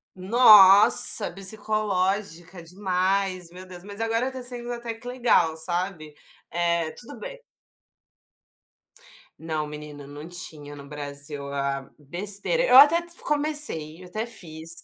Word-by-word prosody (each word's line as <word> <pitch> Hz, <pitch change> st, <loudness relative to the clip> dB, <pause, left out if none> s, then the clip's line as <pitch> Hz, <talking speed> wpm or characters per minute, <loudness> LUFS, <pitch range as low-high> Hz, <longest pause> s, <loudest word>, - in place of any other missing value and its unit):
Nossa, 200 Hz, 0 st, +5 dB
psicológica 195 Hz, -3 st, -3 dB
demais, 185 Hz, 0 st, -3 dB
meu 180 Hz, +2 st, -13 dB
Deus, 180 Hz, -1 st, -13 dB
mas 205 Hz, +3 st, -10 dB
agora 230 Hz, +3 st, -1 dB
tá 260 Hz, -1 st, -9 dB
sendo 245 Hz, -1 st, -4 dB
até 235 Hz, -1 st, -7 dB
que 225 Hz, +2 st, -14 dB
legal, 240 Hz, -10 st, +1 dB
sabe, 170 Hz, -1 st, -4 dB, 0.4 s
eh, 170 Hz, -2 st, -2 dB
tudo 240 Hz, -, -13 dB
bem. -, -, -10 dB, 2.0 s
Não, 160 Hz, -1 st, -4 dB
menina, 150 Hz, -1 st, -11 dB
não 145 Hz, +3 st, -11 dB
tinha 155 Hz, -5 st, -7 dB
no 140 Hz, -1 st, -12 dB
Brasil 145 Hz, 0 st, -8 dB
a 140 Hz, -1 st, -4 dB
besteira, 200 Hz, -, 0 dB
eu 260 Hz, -, +5 dB
até 295 Hz, +4 st, +7 dB
f 345 Hz, 0 st, -6 dB
comecei, 290 Hz, -, +3 dB
eu -, -, -13 dB
até 215 Hz, +5 st, -5 dB
fiz, 165 Hz, -8 st, -4 dB
185 Hz, 125 wpm, -23 LUFS, 160-225 Hz, 2.0 s, até